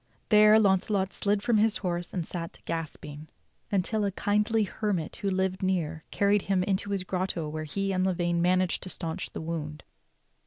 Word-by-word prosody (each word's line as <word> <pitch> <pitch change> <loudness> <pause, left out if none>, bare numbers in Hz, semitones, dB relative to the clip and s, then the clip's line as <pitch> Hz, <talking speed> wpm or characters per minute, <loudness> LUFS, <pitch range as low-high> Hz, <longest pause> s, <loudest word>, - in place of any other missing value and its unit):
There 215 0 +7
Launcelot 195 -1 +2
slid 205 0 0
from 240 -2 +3
his 220 0 +3
horse 175 -2 -3
and 175 -4 -3
sat 165 -1 -6
gasping 155 -2 -5 0.4
until 205 +2 +1
a 200 - 0
kindly 210 +3 +1
hermit 195 -4 -2
who 200 - -1
lived 190 0 -1
near 165 -4 -1
carried 205 0 +2
him 190 -1 +1
into 195 +1 -1
his 195 -2 -1
grotto 185 -3 -2
where 155 +1 -4
he 195 +6 -2
and 185 0 +1
Lavaine 175 -2 +1
managed 185 +1 +2
to 185 - -6
stanch 165 -2 -4
the - - -7
wound. 155 -2 -5
185 Hz, 170 wpm, -28 LUFS, 170-200 Hz, 0.4 s, There